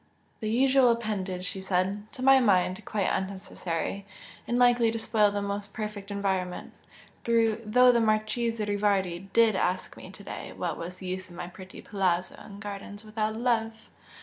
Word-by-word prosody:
"The 215 - -3
usual 260 +2 +4
appendage!" 200 -6 -1
she 190 +1 -3
said 190 +3 -1
"To 255 - -6
my 270 0 +7
mind, 185 -5 +2
quite 205 -3 -1
unnecessary, 190 -1 -3 0.4
and 240 - 0
likely 245 -2 +5
to 225 - -2
spoil 220 -2 +2
the 205 0 -2
most 200 0 -4
perfect 210 -2 -5
environment! 190 -3 -2 0.5
Though 230 +1 +4
the 235 -1 +2
Marchese 220 +1 0
Rivardi 195 -3 0
DID 230 -3 +4
ask 185 0 -1
me - - -10
to - - -12
day - - -7
what - - -3
was 175 +2 -6
the 185 - -10
use 185 +1 -4
of 175 - -12
my 175 - -5
pretty 185 +1 -11
'palazzo' 185 -3 0
and 200 -1 -11
gardens 205 0 -7
without 215 0 -2
love! 225 -2 -1
205 Hz, 165 wpm, -28 LUFS, 190-225 Hz, 0.5 s, my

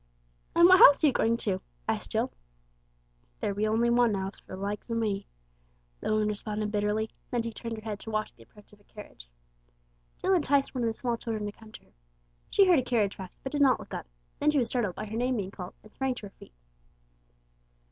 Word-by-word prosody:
"And 340 +1 +8
what 370 +1 +7
house 285 +3 +8
are - - +7
you 285 - +4
going 230 0 +2
to?" 190 -3 0 0.3
asked - - -2
Jill. - - 0 1.1
"There 200 - -1
be 210 +2 0
only 230 +2 +2
one 240 -3 +4
'ouse 190 +1 -4
for - - -13
the - - -5
likes 200 +4 -4
o' 230 - -1
me," 205 -3 -1 0.7
the - - -2
woman 215 0 +2
responded 210 0 -3
bitterly; 210 +1 0 0.2
then 240 -2 -1
she 230 -1 -5
turned 230 +1 -5
her 215 - -9
head 210 -2 -4
to - - -8
watch 215 0 -2
the 115 - -21
approach 205 - -19
of 205 - -18
a - - -25
carriage. 200 - -13 0.9
Jill 385 - +1
enticed 285 -5 +2
one 250 -2 -2
of - - +2
the 225 - 0
small 235 +1 -2
children 220 -2 -3
to 205 - -3
come 220 +1 -16
to - - -11
her. - - -29 0.6
She 395 - +5
heard 355 -5 +5
a - - -1
carriage 225 -5 +1
pass, 190 -2 -9
but 265 - -4
did 290 - 0
not 265 -3 +5
look - - -11
up, - - -5 0.3
then 300 - +3
she 300 - +2
was 240 -4 +1
startled 220 -8 -1
by 215 - -5
her 215 +1 -6
name 250 +2 +1
being 195 -2 -3
called, 180 -2 -8
and 215 - -17
sprang 265 -1 -1
to 220 - -8
her 195 - -11
feet. - - -15
220 Hz, 235 wpm, -29 LUFS, 205-245 Hz, 1.1 s, And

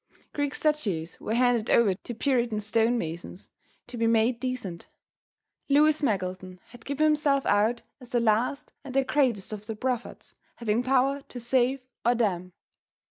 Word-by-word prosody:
Greek 290 -1 -1
statues 200 - -1
were 220 - -2
handed 245 -2 +2
over 220 -5 +4
to 225 +5 -8
Puritan 240 -4 0
stone 225 +3 +1
masons 170 0 -6 0.3
to 245 0 -9
be 230 0 +1
made 230 +1 +2
decent. 245 -10 -4 0.8
Lewis 300 +2 +4
Meggleton 185 -6 -2
had 245 -2 -15
given 285 +2 -1
himself 295 -3 +2
out 215 +4 +2 0.2
as 250 -2 -13
the 240 - +1
last 235 +6 0
and 270 -2 -8
the 270 - +4
greatest 255 -8 0
of 210 0 -8
the 220 - -4
prophets, 245 +1 -4 0.2
having 230 0 0
power 270 +2 +2
to 245 - -8
save 255 +2 +1 0.2
or 240 +1 +3
damn. 185 -6 -1
240 Hz, 155 wpm, -27 LUFS, 215-265 Hz, 0.8 s, over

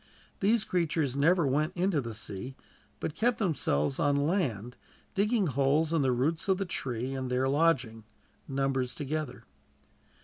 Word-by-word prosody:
These 215 +2 +3
creatures 160 -6 0
never 165 +4 +3
went 155 +7 0
into 180 -4 +1
the 115 -3 -6
sea, 110 +4 -6 0.4
but 150 - -3
kept 235 +8 +1
themselves 140 - 0
on 145 -1 +3
land, 140 - 0 0.4
digging 210 +1 +2
holes 145 +3 +2
in 165 - +3
the 130 -2 +2
roots 145 +9 0
of 190 -1 +3
the 195 - -2
trees, 130 -6 -3
and 130 -1 -3
there 125 +1 +1
lodging, 135 -7 +1 0.4
numbers 135 -2 -1
together. 150 +1 -4
145 Hz, 145 wpm, -30 LUFS, 130-170 Hz, 0.4 s, These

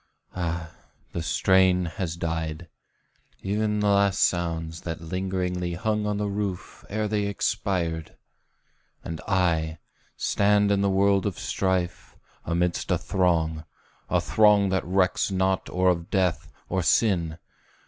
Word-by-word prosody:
Ah, 85 -2 -3 0.4
the 85 - -3
strain 90 +4 +3
Has 85 0 -4
died 80 0 -3 0.8
ev'n 105 +1 0
the 105 - +2
last 100 -1 +3
sounds 80 -2 0
that 80 -2 -5
lingeringly 90 0 -2
Hung 105 +2 -1
on 105 -1 -1
the 105 - -1
roof 100 -2 -4
ere 110 +1 -1
they 105 -1 0
expired! 85 -5 -2 0.9
And 80 -3 -6
I, 85 -4 +1 0.4
Stand 105 0 +2
in 100 -1 +2
the 100 - +2
world 100 0 +3
of 95 - -4
strife, 95 -2 -2 0.3
amidst 85 +1 -1
a - - +3
throng, 80 -4 0 0.5
A - - +3
throng 105 -2 +4
that 95 0 0
recks 90 +2 +1
not 95 0 0
or 90 +1 +2
of 85 0 -1
death, 95 -5 0 0.2
or 95 0 0
sin! 85 -2 +2
90 Hz, 130 wpm, -26 LUFS, 85-100 Hz, 0.9 s, throng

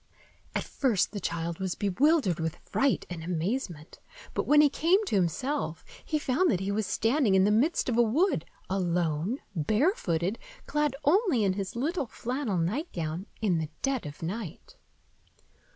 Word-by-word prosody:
At - - 0
first 240 -9 +1
the 205 - -4
child 170 -2 -3
was 190 -3 -2
bewildered 205 - +2
with 160 -1 -2
fright 275 -1 0
and 170 -2 -6
amazement; 175 - -3 0.3
but - - -1
when 295 0 +6
he 300 - +7
came 350 +9 +2
to 295 - -1
himself, 200 - -1 0.2
he 310 - -1
found 295 +5 +2
that 185 - +2
he 195 +1 -2
was 210 -1 -1
standing 225 -3 +2
in 190 - +5
the 205 - +4
midst 260 +11 +2
of 240 -2 +1
a - - +8
wood, 290 - +2 0.2
alone, 175 - 0 0.2
barefooted, 200 - +1 0.3
clad 295 -2 0
only 335 - +3
in 195 -2 +2
his 195 +1 -4
little 290 +3 -1
flannel 240 -2 -2
nightgown, 175 - -2
in 185 -6 +2
the 155 -1 -3
dead 270 - 0
of 145 +2 -9
night. 185 0 -6
210 Hz, 160 wpm, -28 LUFS, 175-275 Hz, 0.3 s, a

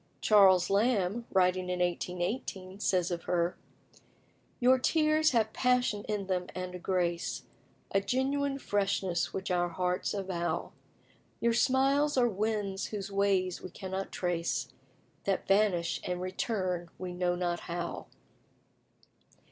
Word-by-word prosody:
Charles 190 -4 +5
Lamb, 210 +1 +1
writing 185 -1 +2
in 180 - -1
1818, 180 +2 -2
says 180 -3 +1
of 170 -1 -4
her 175 0 +1 1.0
"Your 255 +1 +5
tears 310 +2 +3
have 225 -4 +1
passion 250 -5 +1
in 210 -2 -2
them, 180 -1 -1
and 185 0 -4
a 180 - -6
grace, 175 -2 -1 0.5
A 195 - +2
genuine 275 +5 0
freshness 195 -6 0
which 190 0 -4
our 175 -1 +1
hearts 180 +3 -1
avow; 185 -3 -2 0.7
Your 235 0 +2
smiles 275 +4 +3
are 245 -1 +5
winds 205 -2 -1
whose 200 -1 -5
ways 195 -2 +1
we - - -7
cannot 190 +2 -5
trace, 165 -7 -2 0.5
That 195 -1 -1
vanish 195 -4 +2
and 180 0 -2
return 185 -2 -2
we 180 -1 -5
know 175 0 0
not 175 -1 -1
how." 175 0 -5
190 Hz, 125 wpm, -30 LUFS, 180-215 Hz, 1.0 s, Charles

